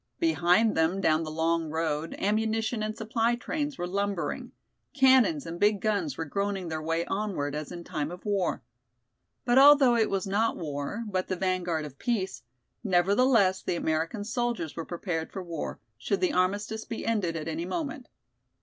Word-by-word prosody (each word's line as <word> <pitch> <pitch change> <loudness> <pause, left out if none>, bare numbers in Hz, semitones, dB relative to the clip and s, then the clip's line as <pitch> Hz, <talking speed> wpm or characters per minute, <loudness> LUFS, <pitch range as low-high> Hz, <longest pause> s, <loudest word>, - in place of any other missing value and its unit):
Behind 220 - +3
them 160 +4 +2
down 160 -4 +3
the 160 - -4
long 165 +1 0
road 160 0 -2
ammunition 220 +2 0
and 215 0 -3
supply 225 +1 +1
trains 290 +2 -3
were 175 - -2
lumbering; 200 0 -2 0.4
cannons 265 +2 +5
and 170 +1 -6
big 205 0 +3
guns 215 +8 -1
were 165 - -3
groaning 195 +2 -2
their 160 -1 -3
way 165 +2 -1
onward 195 -9 -2
as 150 0 -5
in 175 -1 -7
time 150 -2 -3
of 180 +4 -10
war. 200 -4 0 0.8
But 245 +1 +5
although 275 -3 +7
it 225 -2 +2
was 195 -1 -1
not 210 +4 +1
war, 150 +7 -4
but 185 -2 -2
the 185 - -1
vanguard 180 -4 -1
of 140 -2 -11
peace, 215 -6 -1 0.4
nevertheless 200 +1 +3
the - - -2
American 165 +6 -1
soldiers 235 - -2
were 165 - -4
prepared 170 -2 -4
for 190 - -5
war, 170 -2 -5 0.2
should 395 - -1
the 360 -5 +2
armistice 205 +4 0
be 230 - -6
ended 205 -7 0
at 155 -1 -4
any 165 +1 -3
moment. 280 - -4
195 Hz, 170 wpm, -28 LUFS, 165-225 Hz, 0.8 s, although